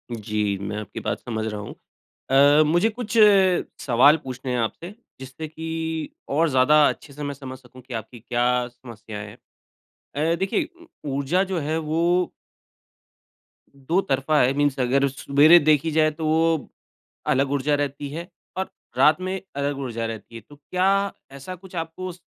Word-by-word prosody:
जी, 105 -2 -1
मैं 105 +1 -4
आपकी 105 - -7
बात - - -3
समझ 110 -2 -4
रहा 105 -1 -4
हूँ। 105 - -8 0.6
अ, 145 +3 +6
मुझे 175 +8 +3
कुछ 230 0 -4 0.6
सवाल 140 +5 +5
पूछने 130 0 -5
हैं 125 - 0
आपसे, 170 - -3 0.3
जिससे 130 +4 -7
कि 160 0 -4 0.2
और 160 +3 +2
ज़्यादा 145 +3 +5
अच्छे 140 - -7
से 150 +1 -7
मैं 145 - -3
समझ 130 -2 -9
सकूँ 130 0 -16
कि 125 0 -10
आपकी 115 +2 -6
क्या 120 +1 0
समस्या 115 -4 -10
है। 105 0 -8 0.8
अ, 160 +3 +1
देखिए 195 - 0 0.4
ऊर्जा 140 +8 +1
जो 185 -3 -2
है 155 +2 -1
वो 160 +1 -1 1.7
दो 150 +7 0
तरफ़ा 140 +1 +1
है, 125 +2 +3
मीन्स 145 -1 +1
अगर 135 +3 +2
सवेरे 145 +5 +5
देखी 155 +1 +2
जाए, 155 0 +3
तो 155 +1 -5
वो 160 -1 +1 0.6
अलग 135 +1 +2
ऊर्जा 145 +1 +1
रहती 145 0 -2
है, 170 +3 -6 0.3
और 190 - -3 0.3
रात 155 +6 +5
में 185 +1 -3 0.2
अलग 140 0 -1
ऊर्जा 115 -4 -3
रहती 115 0 -8
है। 115 - -7
तो 145 - -14
क्या 195 +6 +1 0.2
ऐसा 140 +7 -8
कुछ 185 0 -12
आपको 165 +3 -5
स 175 - -17
145 Hz, 165 wpm, -23 LUFS, 125-160 Hz, 1.7 s, अ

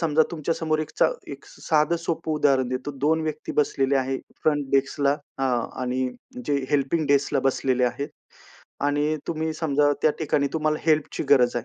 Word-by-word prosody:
समजा 160 -2 +3
तुमच्या 165 0 -2
समोर 155 -1 0
एकचा 155 - +1 0.2
एक - - -10
साधं 155 +1 +1
सोपं 165 -1 -3
उदाहरण 135 -4 +2
देतो. 130 +3 -3
2 160 +2 +3
व्यक्ती 155 -1 -4
बसलेले 140 -2 +2
आहेत. 130 0 -1 0.2
फ्रंट 145 -2 +1
डेस्कला 140 +1 +2 0.2
अ, 135 - -2 0.4
आणि 130 0 -1 0.4
जे 145 - +1 0.2
हेल्पिंग 145 +2 +1
डेस्कला 140 0 +2
बसलेले 130 -1 +1
आहेत 125 +4 -2 0.8
आणि 145 +2 +1
तुम्ही 160 -1 -2
समजा 145 -2 +2
त्या 155 - +5
ठिकाणी 145 -2 +1
तुम्हाला 155 -1 0
हेल्पची 155 -2 +1
गरज 125 -4 +5
आहे. 120 - -2
145 Hz, 160 wpm, -25 LUFS, 135-155 Hz, 0.8 s, त्या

